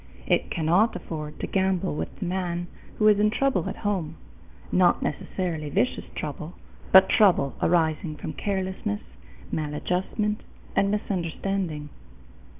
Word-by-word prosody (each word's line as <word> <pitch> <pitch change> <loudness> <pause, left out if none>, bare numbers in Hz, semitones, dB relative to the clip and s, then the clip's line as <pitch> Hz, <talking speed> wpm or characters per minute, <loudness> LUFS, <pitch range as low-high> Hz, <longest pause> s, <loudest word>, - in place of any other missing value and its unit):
It - - +2
cannot 175 +8 +2
afford 150 -2 -6
to - - 0
gamble 190 - +1
with 80 +2 -4
the - - -4
man 175 -1 -2 0.3
who 215 - +4
is 210 -1 +6
in 210 0 +4
trouble 235 -6 +1
at - - -4
home 175 -6 -1 0.6
not 180 -1 +4
necessarily 160 -1 -3
vicious 230 - 0
trouble, 155 +3 -5 0.4
but 190 0 +9
trouble 180 -10 +4
arising 160 -2 +2
from 145 - -6
carelessness, 190 - -2 0.5
maladjustment, 180 +7 -1 0.3
and 200 - +3
misunderstanding. 185 -5 -2
180 Hz, 125 wpm, -26 LUFS, 155-195 Hz, 0.6 s, but